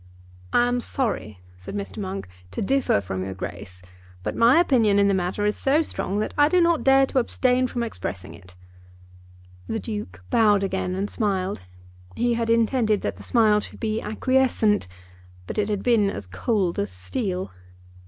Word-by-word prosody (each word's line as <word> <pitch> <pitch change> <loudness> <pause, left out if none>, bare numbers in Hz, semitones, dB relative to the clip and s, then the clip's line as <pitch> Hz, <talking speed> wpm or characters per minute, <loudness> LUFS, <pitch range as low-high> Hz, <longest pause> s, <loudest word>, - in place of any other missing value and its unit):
"I 240 - +4
am 245 0 0
sorry," 155 - -2 0.2
said 90 - -8
Mr. 200 +1 -5
Monk, 195 - -5 0.2
"to - - -5
differ 265 - +2
from 95 0 -4
your 95 0 -5
Grace, 90 0 -8 0.4
but - - -3
my 235 +7 +5
opinion 235 -11 +3
in 200 0 +4
the 200 - +3
matter 190 +2 -1
is 210 - +1
so 290 +4 +2
strong 200 -9 -3
that - - -3
I 290 +1 +6
do 365 - +3
not 340 -2 +3
dare 270 0 +5
to 265 - 0
abstain 255 +1 +1
from 240 -1 -3
expressing 95 - -6
it." 90 -1 -15 1.1
The 225 - -2
Duke 210 - -6
bowed 210 -3 +4
again 190 -1 -2
and 195 +2 -1
smiled. 195 - -2 0.5
He 240 0 +1
had 230 -1 -1
intended 230 -2 +2
that - - -3
the - - -11
smile 215 -3 +3
should - - -9
be 220 -1 -1
acquiescent, 230 - +1 0.6
but - - -4
it 205 0 0
had 205 -2 -2
been 225 -5 +3
as 100 - -5
cold 175 - -1
as 100 - -1
steel. 185 - -4
210 Hz, 175 wpm, -24 LUFS, 185-245 Hz, 1.1 s, I